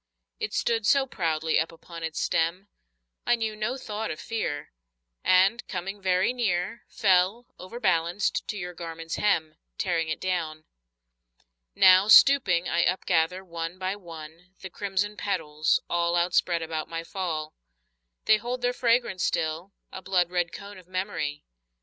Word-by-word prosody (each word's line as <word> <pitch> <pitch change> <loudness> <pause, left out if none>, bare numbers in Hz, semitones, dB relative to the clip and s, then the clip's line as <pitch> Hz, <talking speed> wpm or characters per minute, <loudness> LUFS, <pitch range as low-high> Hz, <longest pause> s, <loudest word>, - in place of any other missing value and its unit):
It 445 -1 -3
stood 225 -3 0
so 275 -1 +4
proudly 160 -8 0
up 160 - -1
upon 165 0 -11
its 160 -1 -4
stem, 175 +5 0 0.6
I 240 - +5
knew 220 -2 -3
no 215 +5 -2
thought 220 -3 -4
of 155 - -5
fear, 145 -10 -4 0.5
And 190 +6 +4
coming 195 +2 -5
very 185 +4 +2
near 205 -2 -2
Fell, 195 +2 +2
overbalanced, 180 -3 -1
to 210 - -4
your 180 -2 -5
garment's 165 -1 -6
hem, 160 -7 +1 0.2
Tearing 165 -4 0
it 155 - -2
down. 160 -4 -3 1.1
Now, 185 +2 +7
stooping, 210 -7 +6
I 170 - +2
upgather, 180 0 +1
one 170 0 -5
by 185 +1 -2
one, 170 0 -12
The 190 - -8
crimson 205 +2 -2
petals, 155 -6 0
all 170 0 +1
Outspread 175 -1 +1
about 160 -1 -4
my 165 0 -4
fall. 165 -4 -4 0.7
They 215 - +6
hold 245 +3 -5
their 245 0 +2
fragrance 235 -6 +1
still, 160 +4 -1 0.2
a 190 - -7
blood 180 -2 +1
red 175 -1 0
cone 200 0 -9
Of 180 - -18
memory. 185 -6 -3
185 Hz, 145 wpm, -27 LUFS, 165-205 Hz, 1.1 s, Now